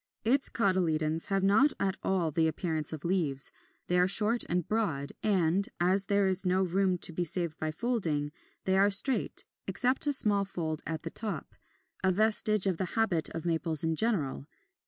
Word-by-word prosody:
Its 265 +5 +1
cotyledons 165 -6 -1
have 195 -1 -1
not 220 +10 +3
at 195 -1 -1
all 180 -4 -1
the 160 +2 0
appearance 160 -2 -3
of 155 -1 -8
leaves; 160 -7 0 0.3
they 180 0 0
are 180 - +3
short 220 +4 +4
and 175 -1 -2
broad, 165 -11 -2
and 195 -1 0
(as 190 +3 +3
there 200 -1 +1
is 190 0 +3
no 185 0 0
room 185 0 0
to 170 - +2
be 175 - -2
saved 170 -1 -2
by 155 - -3
folding) 160 -7 -2 0.3
they 190 0 +1
are 200 +1 +4
straight, 225 +7 +1 0.2
except 255 +4 0
a 290 - +3
small 205 -6 +6
fold 160 -5 -5
at 160 -1 -5
the 165 - -6
top, 215 -2 -3 0.5
a 190 - +2
vestige 215 0 +4
of 190 -4 -1
the 185 - -2
habit 195 -8 0
of 165 0 -7
Maples 165 -2 +1
in 160 0 -1
general. 155 - -1
185 Hz, 180 wpm, -28 LUFS, 160-205 Hz, 0.5 s, small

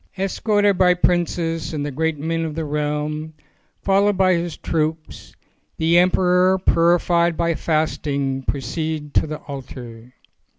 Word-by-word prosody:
Es 195 0 -2
corted 205 -3 +2
by 180 -1 +5
princes 170 -2 0
and 145 -1 -2
the 145 - -3
great 160 +3 -1
men 165 +3 -2
of 155 -2 -4
the 160 -1 -3
realm, 150 +1 -3 0.5
followed 200 0 +2
by 185 -1 +4
his 170 -1 -2
troops, 160 0 -3 0.4
the 165 +2 +4
emperor 180 +1 +3
purified 170 -1 +2
by 170 0 +1
fasting 145 -4 -1
proceeded 150 +3 -3
to - - +2
the 155 0 -4
altar. 125 -4 -9
160 Hz, 135 wpm, -21 LUFS, 150-180 Hz, 0.5 s, by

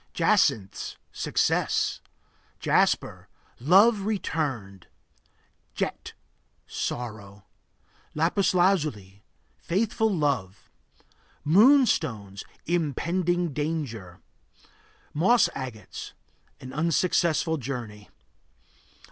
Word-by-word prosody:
Jacinths 100 -3 +1
Success. - - 0 0.6
Jasper - - +1 0.3
Love 195 - +5
returned. 140 - -3 0.9
Jet - - -4 0.5
Sorrow. 105 -5 -6 0.7
Lapis 175 +4 +1
lazuli 150 - +1 0.4
Faithful 220 +5 0
love. 135 - -2 0.7
Moonstones 155 - +3 0.2
Impending 175 +1 0
danger. 130 - -4 0.9
Moss 195 +11 +4
agates 125 -5 -7 0.5
An 130 0 -10
unsuccessful 165 +1 +1
journey. 115 -6 -6
150 Hz, 60 wpm, -26 LUFS, 110-180 Hz, 0.9 s, Love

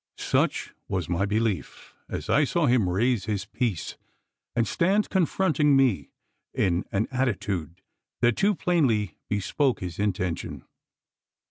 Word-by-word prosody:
Such - - 0
was 90 -4 -2
my 90 +4 0
belief, 105 -6 -2 0.2
as - - -5
I 150 - +4
saw 165 +3 +1
him 120 -8 +3
raise 110 +2 +1
his 105 -2 -2
piece, 105 - -3 0.6
and 115 -1 +2
stand 195 +4 +1
confronting 165 -5 +2
me 130 -7 +2 0.5
in 90 -2 +1
an 100 +3 0
attitude 95 - -2 0.4
that 120 -1 +4
too 205 +1 +2
plainly 130 - +1
bespoke 120 +6 0
his 90 -1 -6
intention. 90 -4 -2
110 Hz, 125 wpm, -26 LUFS, 95-140 Hz, 0.6 s, I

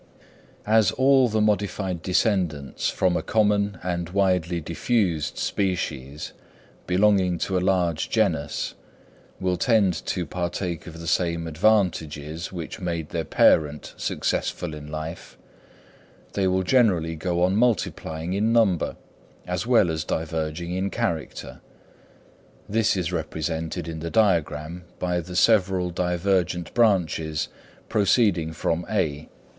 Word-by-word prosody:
As 110 -2 +4
all 130 0 +4
the 110 0 +1
modified 100 -4 0
descendants 90 - 0
from 90 -2 +1
a - - 0
common 105 -2 +1
and 85 -2 -2
widely 90 -3 +1
diffused 85 -1 -1
species, 75 -7 -2 0.5
belonging 95 -1 +3
to 95 - -2
a 90 - +2
large 90 -4 +1
genus, 85 -10 0 0.7
will 90 -1 0
tend 100 -1 +3
to 90 -3 -1
partake 85 +1 -3
of 80 0 -9
the 85 - -8
same 85 0 0
advantages 80 -4 0
which 85 +2 -6
made 85 -3 -3
their - - -2
parent 75 -2 +2
successful 85 -3 -2
in 75 -1 -8
life, 80 +2 -7 1.0
they 95 -2 +1
will 95 0 +1
generally 90 -8 +2
go 85 +2 -1
on 95 +2 +2
multiplying 95 -7 0
in 105 +3 +1
number 110 -7 +2 0.5
as 90 +5 -3
well 115 -9 +4
as 80 -1 -2
diverging 80 +2 -3
in 95 +2 -1
character: 100 -10 -3 1.1
this 110 -1 +1
is 90 -2 -1
represented 80 +1 -3
in 80 -1 -5
the 85 +1 -4
diagram 85 -5 +1
by 90 -1 -1
the 90 +2 -7
several 95 -3 +3
divergent 90 -1 0
branches 85 -9 +1 0.4
proceeding 100 -5 +2
from 85 +1 -1
(A). 80 -8 -1
90 Hz, 120 wpm, -24 LUFS, 80-100 Hz, 1.1 s, As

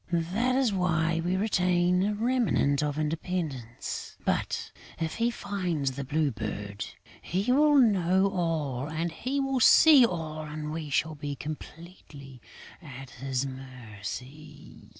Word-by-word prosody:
That 250 +5 +1
is 260 -5 +2
why 165 -3 +1
we 180 +2 0
retain 180 -3 +2
a 205 +2 0
remnant 225 - +1
of 150 -1 -1
independence; 155 -6 -4
but, - - -1 0.3
if 160 -1 -3
he 230 +1 +2
finds 180 - -2
the 140 +2 -5
Blue 145 +1 0
Bird, 105 -2 -5 0.4
he 195 +8 -1
will 295 +3 +5
know 195 -7 +4
all, 155 -7 -1
he 170 - -2
will 270 -1 0
see 290 +3 +8
all 160 -7 -1
and 150 0 -5
we 155 -1 -5
shall 155 +2 0
be 145 -1 -5
completely 150 -3 -10 0.4
at 135 -4 -10
his 130 +2 -2
mercy.... 130 +3 -9
160 Hz, 130 wpm, -28 LUFS, 140-190 Hz, 0.4 s, see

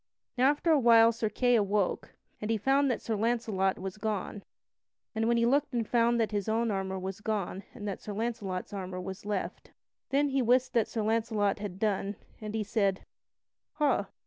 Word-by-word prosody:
Now 255 +1 +4
after 295 +3 +1
a 305 - +5
while 230 -2 +7
Sir 225 -1 -2
Kay 245 +3 +2
awoke, 205 -3 0 0.3
and 210 - -3
he 225 - +2
found 270 +6 +2
that 245 - -2
Sir 225 - -1
Launcelot 215 -4 0
was 190 +2 -6
gone, 210 -1 -3 0.7
and 225 0 0
when 235 0 +3
he 230 - +3
looked 280 +4 +2
he 240 -3 0
found 235 +1 +2
that 225 -1 +1
his 205 -1 -2
own 225 +1 +1
armor 190 -1 -2
was 190 +2 -5
gone 205 -3 -2
and 210 -4 -6
that 200 - -4
Sir 210 - -6
Launcelot's 205 -4 -3
armor 185 -2 -5
was 190 +2 -7
left. 205 -2 -3 0.4
Then 285 +1 +2
he 270 -1 +1
wist 250 +2 +2
what 230 -3 +2
Sir 220 - -3
Launcelot 220 -2 +1
had 200 -3 -5
done, 200 -1 -1 0.3
and 215 0 -5
he 220 - 0
said: 200 -2 0 0.7
"Ha! 270 -10 +1
220 Hz, 195 wpm, -30 LUFS, 200-235 Hz, 0.7 s, while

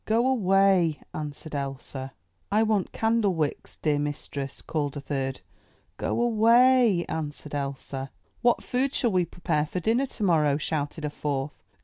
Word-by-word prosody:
*'Go 230 +3 +2
away!" 195 - +3
answered 150 +1 -6
Elsa. 135 -1 -5 0.4
"I 215 +2 +4
want 215 -4 +1
candlewicks, 205 -9 0
dear 150 -2 +2
mistress," 145 -1 -4
called 145 -2 -2
a - - -3
third. 135 -2 -3 0.6
"Go - - -1
away!" 235 -3 +5
answered 150 -2 -5
Elsa. 140 -1 -4 0.3
"What 240 0 +3
food 265 +2 0
shall 235 - +2
we 180 -2 +2
prepare 160 -3 -1
for 180 - -3
dinner 230 +8 +1
tomorrow?" 160 - +2
shouted 150 0 -2
a 150 - -2
fourth. 145 -1 -3
160 Hz, 135 wpm, -27 LUFS, 145-220 Hz, 0.6 s, away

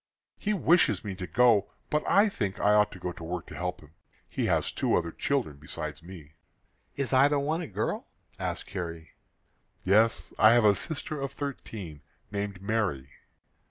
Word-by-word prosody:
"He 210 - -1
wishes 170 - +3
me 100 -3 -4
to 90 -1 -6
go, 115 +2 +3 0.2
but 150 - +1
I 205 +2 +6
think 105 - -3
I 105 +1 +4
ought 105 0 +4
to - - -9
go 90 0 -3
to 85 - -10
work 85 +1 -4
to - - -10
help 90 0 -3
him. 75 0 -18 0.3
He - - -2
has - - +1
two - - +1
other 85 -1 0
children 125 - -1
besides 75 +2 -6
me." 85 -4 -11 0.6
"Is 140 -1 -2
either 140 +3 +5
one 155 +4 0
a 165 - -5
girl?" - - -3 0.3
asked - - -3
Carrie. 85 -4 -6 0.7
"Yes; 110 +4 +3
I 110 +1 +8
have 120 -2 +4
a 105 - +7
sister 150 - -4
of 135 0 -3
thirteen, 105 - -6 0.3
named 100 -2 -4
Mary." 100 -12 -1
105 Hz, 175 wpm, -28 LUFS, 90-140 Hz, 0.7 s, I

